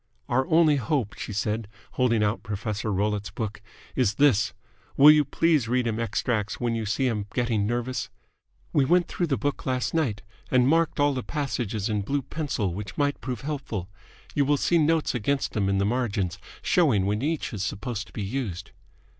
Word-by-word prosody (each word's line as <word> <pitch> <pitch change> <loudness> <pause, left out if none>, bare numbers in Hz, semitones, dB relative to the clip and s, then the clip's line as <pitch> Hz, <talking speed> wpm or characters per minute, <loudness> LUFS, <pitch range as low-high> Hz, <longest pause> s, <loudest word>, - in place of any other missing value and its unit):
"Our 130 +2 +1
only 160 -2 +5
hope," 120 -4 -1
she - - -6
said, 105 +1 -1 0.2
holding 115 -4 +2
out 105 +2 0
Professor 105 +1 -3
Rollitt's 105 +1 0
book, 105 -2 -5 0.3
"is 115 -6 +2
this. 135 -7 +4 0.5
Will 145 +2 +10
you 150 -1 +5
please 150 -2 +2
read 125 +1 +1
him 115 -1 -1
extracts 115 -2 -1
when 120 -1 0
you 110 -2 -2
see 120 +6 0
him 105 -5 -1
getting 115 -4 +1
nervous? 120 +2 -2 0.6
We - - +4
went 175 +5 +3
through 175 - -1
the 135 -4 0
book 145 -1 -2
last 130 -1 0
night 135 -12 0 0.3
and 125 -1 +4
marked 165 +1 +2
all 145 0 +4
the 130 - -2
passages 120 -8 -2
in 105 -2 0
blue 140 +7 -1
pencil 130 - -2
which 100 0 -7
might 145 0 0
prove 125 -3 -4
helpful. 130 - -4 0.4
You 145 - +3
will 145 +1 +3
see 170 +4 +2
notes 160 0 +2
against 135 +4 0
them 100 -2 0
in 100 - +1
the 100 - +2
margin, 105 -5 0 0.3
showing 135 - +3
when 105 +2 0
each 155 -1 -2
is 105 - -4
supposed 110 +1 -4
to - - -17
be 105 - -4
used." 100 -5 -4
120 Hz, 190 wpm, -26 LUFS, 105-140 Hz, 0.6 s, Will